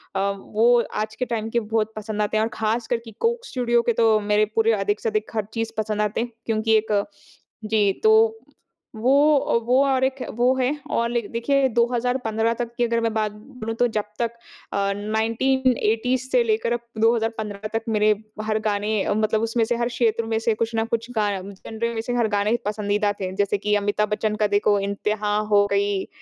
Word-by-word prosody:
अ, - - +1 0.2
वो 235 +4 +3 0.2
आज 215 0 -8
के 250 - -2
टाइम 225 -2 -3
के 235 - +1
बहुत 220 0 -1
पसंद 215 0 -4
आते 210 +1 0
हैं 215 - +2
और 225 - -1
ख़ास 225 +2 0
कर 240 - +1
कि 225 - -9
कोक 475 +1 0
स्टूडिओ 240 - +1 0.2
तो, 225 -2 +4
मेरे 210 0 +2
पूरे 225 0 +4
अधिक 205 +2 0
से 225 - -1
अधिक 215 0 -2
हर 215 -2 0
चीज़ 225 -1 -2
पसंद 215 -1 -1
आते 210 +2 0
हैं। 240 0 -4
क्योंकि 220 0 +1
एक 210 -2 +1 0.6
जी, 210 -2 +2
तो 445 +1 +5 0.6
वो 240 +5 +2 0.2
अ, - - -1
वो 255 +3 +4
और 265 -1 +1
एक 265 0 0
वो 245 +2 +3
है 260 0 +1 0.2
और 235 0 +1
लाइक 235 -3 -2
देखिए, 270 +4 +2
2015 235 -1 0
तक 235 -1 -3
की 245 - +2
अगर 230 -1 +1
मैं 230 -1 0
बात 215 -1 0
बोलूँ, 225 +1 -7
तो 245 +2 +2
जब 210 - +1 0.2
तक 235 -1 0 0.4
अ, 200 0 +1
1980s 230 +3 0
से 250 -2 +4
लेकर 225 +1 0
अब 240 - -1 0.2
2015 225 -2 0
तक 225 0 -1
मेरे 215 -1 +3 0.3
हर 215 0 0
गाने 205 0 0
अ, - - 0
मतलब 215 +1 +1
उसमें 225 +1 +1
से 240 - 0
हर 235 0 0
क्षेत्र 230 -2 0
में 225 0 -1
से 225 0 +1
कुछ 230 +1 -2
ना 225 - +2
कुछ 230 +1 -7
गा 210 -1 +2
जेनर 220 +4 -5
में 225 - -1
से 245 +2 -4
हर 235 -2 +2
गाने 210 +3 +2
पसंदीदा 205 0 0
थे, 185 -1 -2
जैसे 205 +1 +1
कि 210 +1 0
अमिताभ 205 +1 0
बच्चन 210 0 -1
का 210 0 +1
देखो, 205 0 +2
"इंतहा 205 +1 -1 0.2
हो 205 0 +6
गई 200 -1 0
225 Hz, 205 wpm, -23 LUFS, 210-235 Hz, 0.6 s, हो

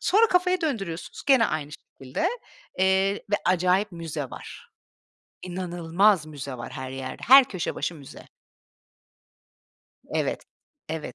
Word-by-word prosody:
Sonra 440 +4 +4
kafayı 360 0 +2
döndürüyorsunuz 195 - -4
gene 265 -5 +5
aynı 150 -1 -3
şekilde, 130 -3 -4 0.5
eee, 190 +1 +3 0.2
ve 205 - +3
acayip 185 +3 +2
müze 165 -3 -5
var. - - -11 0.7
İnanılmaz 175 0 +1
müze 140 -3 -7
var 120 - -7
her 130 0 -6
yerde, 130 -1 -6
her 270 +1 +10
köşe 185 -4 -4
başı 170 - -3
müze. 140 -3 -12 1.8
Evet, - - -2 0.4
evet. 155 -6 -5
180 Hz, 120 wpm, -25 LUFS, 150-205 Hz, 1.8 s, her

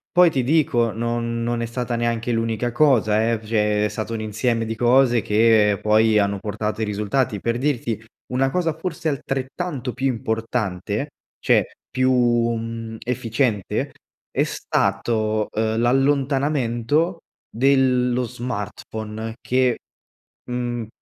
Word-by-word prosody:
Poi 175 -2 +7
ti 135 - +1
dico 120 -5 +2
non 115 +1 -2
non 120 0 -1
è 115 - -2
stata 120 0 -3
neanche 120 0 -1
l’unica 115 +1 -1
cosa 115 -5 +3
eh, 115 - 0
cioè 105 -1 +1
è - - +2
stato 110 +2 -4
un 110 - -3
insieme 115 +2 -1
di 115 - -3
cose 120 0 +4
che 105 -1 +4
poi 110 0 +4
hanno 100 -1 +1
portato 105 +1 -3
i - - +2
risultati. 105 +2 -1
Per 115 +3 -1
dirti, 120 -6 -1 0.3
una 135 +1 +2
cosa 165 0 0
forse 165 0 -4
altrettanto 135 0 -3
più 135 - -1
importante, 110 0 -2 0.3
cioè - - +2 0.2
più, 130 +1 +2
mhmm, 115 -2 0
efficiente 115 -3 -1 0.4
è - - +1
stato, 110 +2 0
uhm, 110 +1 0
l’allontanamento 135 +3 +1 0.3
dello 125 -1 +2
smartphone 110 -1 -5
che, 130 -1 +1 0.7
mhmm, 120 -2 -3
115 Hz, 125 wpm, -22 LUFS, 110-130 Hz, 0.7 s, Poi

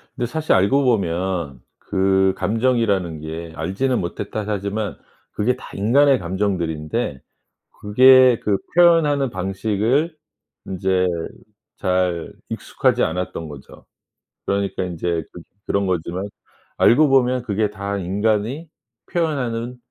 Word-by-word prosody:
근데 125 - -2
사실 155 +5 0
알고 100 +10 +3
보면 90 - -1 0.2
그 95 -1 +2
감정이라는 105 -5 0
게 80 +1 -7
"알지는 125 +10 -1
못했다." 90 +5 -4
하지만 100 0 -3 0.3
그게 120 +4 0
다 - - -12
인간의 130 +6 +4
감정들인데 85 - -2 0.6
그게 130 +3 +6
그 100 -2 +1 0.2
표현하는 160 -6 +4
방식을 105 - -1 0.5
인제 95 0 0 0.7
잘 90 -3 -1 0.2
익숙하지 - - 0
않았던 85 -1 -3
거죠. 70 -2 -13 0.6
그러니까 100 -1 -1
인제 85 -2 -2
그 - - -11 0.2
그런 100 -1 0
거지만 90 +2 -2 0.5
알고 145 +5 +5
보면 130 -2 +3
그게 105 -2 0
다 100 -1 -4
인간이 105 - -1 0.4
표현하는 125 -8 -2
100 Hz, 250 characters per minute, -21 LUFS, 90-125 Hz, 0.7 s, 그게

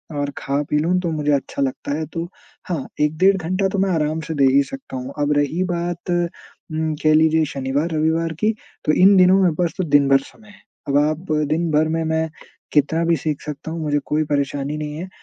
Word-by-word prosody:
और 145 0 -1
खा-पी 145 +2 -1
लूँ 180 +4 +1
तो 170 -2 -2
मुझे 150 -1 0
अच्छा 140 0 -2
लगता 135 +1 -2
है 160 - -2
तो 170 0 -3 0.4
हाँ, 160 -6 -2
1 150 +1 +1
डेढ़ 195 +2 +4
घंटा 185 +3 0
तो 195 - -2
मैं 195 0 +2
आराम 155 -1 0
से 160 - -3
दे 140 -1 +4
ही 140 0 +5
सकता 265 - -9
हूँ। 130 +2 -6
अब 145 0 +1
रही 150 +6 +1
बात 175 0 -3
उम, 160 -2 -3
कह 155 0 +5
लीजिए 160 0 +4
शनिवार-रविवार 155 +4 -1
की 220 +1 +3 0.3
तो 155 - +3
इन 195 +2 +6
दिनों 185 +1 +6
मेरे 175 -4 +3
पास 175 -2 +1
तो 185 - 0
दिन-भर 140 -3 +4
समय 215 +9 -16
है। 205 - -18 0.3
अब 140 - +3
आप 155 +3 0 0.2
दिन-भर 155 -1 +1
में 165 0 0
मैं 160 0 0 0.4
कितना 155 +3 +2
भी 170 0 +3
सीख 150 +1 -3
सकता 150 +1 -6
हूँ 165 0 -4
मुझे 145 -1 +1
कोई 155 +1 0
परेशानी 145 0 -2
नहीं 150 -1 -5
है। 180 +3 -5
155 Hz, 210 wpm, -21 LUFS, 145-170 Hz, 0.4 s, इन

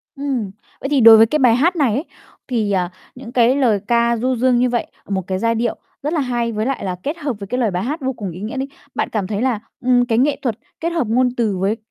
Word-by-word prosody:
Ừm. 270 -8 -2 0.3
Vậy 270 - -3
thì 285 -3 +3
đối 225 -1 +10
với 220 - +7
cái 305 +7 0
bài 245 -4 +5
hát 335 +9 +2
này 280 -9 +2
ấy, 275 +8 -2 0.4
thì, 225 -5 0
ờ, 180 -3 0 0.3
những 250 -2 -10
cái 245 +1 +4
lời 240 -7 +2
ca 235 0 +2
du 255 +3 0
dương 250 +1 +2
như 250 0 +2
vậy, 240 -1 -1 0.2
một 195 -1 0
cái 185 -1 -2
giai 230 +2 +1
điệu 230 +1 -1 0.3
rất 300 +3 -1
là 330 - +1
hay, 240 -3 -1
với 215 0 -2
lại 270 +1 -2
là 185 -1 -2
kết 300 +4 -3
hợp 290 -5 -2
với 200 - -7
cái 250 +5 -2
lời 230 -5 +1
bài 180 +1 -2
hát 295 +7 -3
vô 265 0 -1
cùng 205 -6 -6
ý 175 +3 -9
nghĩa 220 +6 -5
đi, 265 +1 -2 0.3
bạn - - -1
cảm 205 -4 -2
thấy 205 0 -2
là, 250 -4 +1 0.2
ừm, 245 0 +3
cái 230 -2 0
nghệ 275 +4 +2
thuật 235 -5 -2 0.2
kết 335 - -1
hợp 330 -8 -1
ngôn 250 +3 +2
từ 215 -5 0
với 195 +4 0
240 Hz, 275 wpm, -19 LUFS, 220-265 Hz, 0.4 s, đối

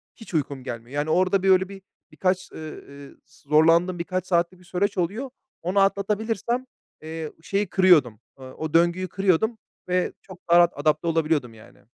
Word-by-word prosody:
hiç 225 -4 -13
uykum 140 -4 -2
gelmiyor. 120 +3 -7
Yani 150 +2 -1
orada, 185 +3 +2
böyle, 190 0 +4
bir 195 -1 -10 0.3
birkaç, 185 0 -1
eee, - - -10 0.3
eee, 140 0 -12 0.2
ıs - - -23
zorlandığım 165 +4 +3
birkaç 185 +1 -3
saatlik 175 0 0
bir 180 - -19
süreç 190 +3 -1
oluyor. 205 +10 -2 0.3
Onu 185 +4 0
atlatabilirsem, 215 +5 0 0.4
eee, 160 0 -6
şeyi 200 +2 -1
kırıyordum, 165 - +4 0.2
eee, 130 - -10
o 155 +4 -6
döngüyü 175 +2 +3
kırıyordum 195 +5 +1 0.3
ve 180 0 0
çok 185 -2 -13
daha 170 - +6
rahat 175 0 +5
adapte 155 +3 +1
olabiliyordum 155 -7 0
yani. 110 0 -17
175 Hz, 165 wpm, -24 LUFS, 155-190 Hz, 0.4 s, daha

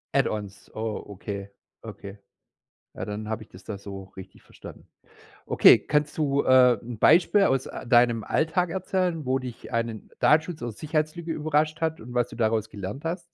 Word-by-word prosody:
Add-ons, 100 -2 -2
oh, 110 -1 -4
okay, 100 0 -7 0.3
okay. 100 +1 -9 0.8
Ja, - - -5
dann 105 +1 -5
habe 110 0 -3
ich - - -19
das 90 +1 -15
da 105 -2 -6
so 100 -1 -8
richtig 95 - -12
verstanden. - - -13 0.6
Okay, - - +7
kannst 150 +1 -1
du, 140 -2 +1
äh, 125 -2 +6
'n 120 -1 -7
Beispiel 190 +4 +5
aus, 135 -7 +1
äh, - - -8
deinem 120 -2 +4
Alltag 165 +2 +1
erzählen, 180 -3 -1
wo 130 +1 +1
dich 125 -2 -9
einen 115 -2 -3
Datenschutz 155 +2 +2
aus 120 -3 -5
Sicherheitslücke 155 +2 -2
überrascht 155 0 0
hat 160 -1 -2
und 120 +2 -10
was 120 -1 +1
du - - -10
daraus 110 -1 0
gelernt 105 - -7
hast? 170 +2 -2
125 Hz, 170 wpm, -26 LUFS, 110-155 Hz, 0.8 s, Okay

